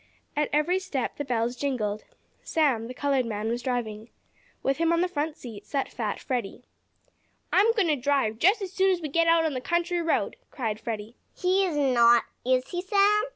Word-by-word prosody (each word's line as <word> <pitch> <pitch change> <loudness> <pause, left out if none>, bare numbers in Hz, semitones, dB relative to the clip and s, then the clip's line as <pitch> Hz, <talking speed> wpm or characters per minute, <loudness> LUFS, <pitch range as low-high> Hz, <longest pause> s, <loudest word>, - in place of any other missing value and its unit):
At 295 0 +1
every 305 +6 +2
step 310 -10 -3
the 290 - -2
bells 240 -2 -1
jingled. 220 -6 -2 0.4
Sam, 265 -8 +1
the 250 - -7
colored 275 -2 +1
man, 215 0 -3
was 240 +1 -2
driving. 230 -3 -3 0.5
With 270 0 +1
him 330 0 +2
on 335 0 +2
the 360 - +2
front 310 -2 -3
seat 220 -5 -9
sat 275 -2 -2
fat 215 -3 -3
Freddie. 245 -2 -4 0.9
"I'm 420 +4 +5
going 420 -5 +2
to 300 - +3
drive, 260 -4 0
as 390 0 +3
soon 385 0 +3
as 370 -2 +2
we 310 -3 -5
get 335 +3 +2
out 330 0 +4
on 310 - 0
the 255 - -3
country 345 +4 0
road!" 330 -1 0
cried 220 -6 -3
Freddie. 225 0 -6 0.2
"He 375 +2 +2
is 320 -4 -2
not; 240 -4 +5 0.2
is 255 0 +1
he, 355 -1 -3
Sam?" 405 +3 +3
280 Hz, 195 wpm, -27 LUFS, 235-345 Hz, 0.9 s, I'm